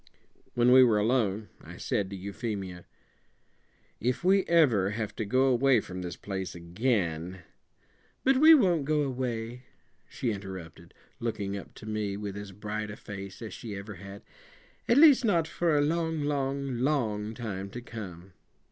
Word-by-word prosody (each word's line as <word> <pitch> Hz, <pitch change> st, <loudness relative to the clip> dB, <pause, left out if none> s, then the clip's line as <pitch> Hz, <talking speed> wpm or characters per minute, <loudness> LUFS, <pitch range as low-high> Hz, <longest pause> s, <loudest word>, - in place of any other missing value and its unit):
When 120 Hz, +1 st, +4 dB
we 130 Hz, 0 st, +9 dB
were 115 Hz, -4 st, +4 dB
alone, 105 Hz, -2 st, +1 dB
I -, -, -10 dB
said 100 Hz, -2 st, -1 dB
to 100 Hz, -, -6 dB
Euphemia: 95 Hz, -2 st, -5 dB, 1.1 s
"If 125 Hz, +7 st, -1 dB
we 190 Hz, +1 st, +4 dB
ever 125 Hz, -, +4 dB
have 110 Hz, 0 st, -4 dB
to 110 Hz, -, -2 dB
go 130 Hz, +6 st, +2 dB
away 130 Hz, -1 st, +4 dB
from 90 Hz, -3 st, -7 dB
this 90 Hz, -1 st, -5 dB
place 95 Hz, -3 st, -5 dB
again 90 Hz, -2 st, -1 dB, 0.4 s
" -, -, -37 dB
"But 270 Hz, 0 st, +4 dB
we 315 Hz, +3 st, +9 dB
won't 180 Hz, -, +3 dB
go 150 Hz, 0 st, +2 dB
away," 125 Hz, -3 st, -3 dB, 0.5 s
she 120 Hz, -, -2 dB
interrupted, 95 Hz, -4 st, -8 dB, 0.2 s
looking 100 Hz, -4 st, -3 dB
up 100 Hz, -, -9 dB
to -, -, -11 dB
me 105 Hz, -2 st, -2 dB
with 100 Hz, -1 st, -5 dB
as 100 Hz, -1 st, -7 dB
bright 105 Hz, +2 st, -4 dB
a 105 Hz, -, -7 dB
face 100 Hz, +2 st, -8 dB
as 110 Hz, -, -7 dB
she 110 Hz, -4 st, -7 dB
ever 100 Hz, +2 st, -7 dB
had; 100 Hz, +2 st, -10 dB, 0.6 s
"at 235 Hz, -, +4 dB
least, 290 Hz, -4 st, +8 dB
not 170 Hz, -8 st, +2 dB
for 165 Hz, -2 st, +1 dB
a -, -, +4 dB
long, 160 Hz, 0 st, 0 dB
long, 140 Hz, -3 st, -1 dB
long 110 Hz, -6 st, 0 dB
time 100 Hz, -5 st, -5 dB
to 120 Hz, -, -7 dB
come. 95 Hz, -7 st, -9 dB
110 Hz, 165 wpm, -29 LUFS, 100-135 Hz, 1.1 s, we